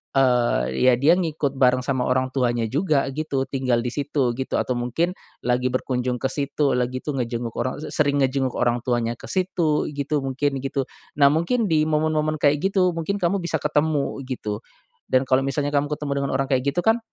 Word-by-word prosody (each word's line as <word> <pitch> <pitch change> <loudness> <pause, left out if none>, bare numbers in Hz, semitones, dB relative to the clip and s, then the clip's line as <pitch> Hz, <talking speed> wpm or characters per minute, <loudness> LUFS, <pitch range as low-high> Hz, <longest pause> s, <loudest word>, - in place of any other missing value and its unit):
eee, 125 - +3 0.2
ya - - +5
dia 155 +4 +6
ngikut 155 -6 -1
bareng 130 -1 +4
sama 130 -2 0
orang 130 0 +1
tuanya 120 -3 +1
juga, 145 - +1
gitu, 140 -2 -2
tinggal 130 -3 0
di 125 - -2
situ, 140 -3 0
gitu. 130 - -4
Atau 125 - -1
mungkin, 125 +9 -1 0.3
lagi 125 +1 +1
berkunjung 125 -1 -1
ke 135 - 0
situlah, 140 -2 0
gitu, 130 +3 -4
ngejenguk 120 -2 -3
orang 130 +3 -2
se - - -6
sering 145 -2 +2
ngejenguk 130 -1 +1
orang 120 0 +1
tuanya 120 -1 0
ke - - -11
situ, 180 -5 0
gitu, 145 0 -1
mungkin, 135 0 -1
gitu. 135 -1 -1 0.3
Nah, 140 -1 +6
mungkin 215 +9 +1
di 155 -3 +2
momen-momen 155 0 +1
kayak 145 0 +3
gitu, 185 -2 +3
mungkin 165 +5 -2
kamu 185 +2 +1
bisa 170 - -1
ketemu 150 -2 0
gitu, 110 -4 -4 0.5
dan 130 +1 +3
kalau 130 +1 +3
misalnya 145 +1 -1
kamu 145 0 +1
ketemu 150 -1 -3
dengan 140 - -2
orang 135 - 0
kayak 130 +1 +2
gitu 175 - 0
kan, 225 +1 +4
140 Hz, 190 wpm, -23 LUFS, 125-155 Hz, 0.5 s, dia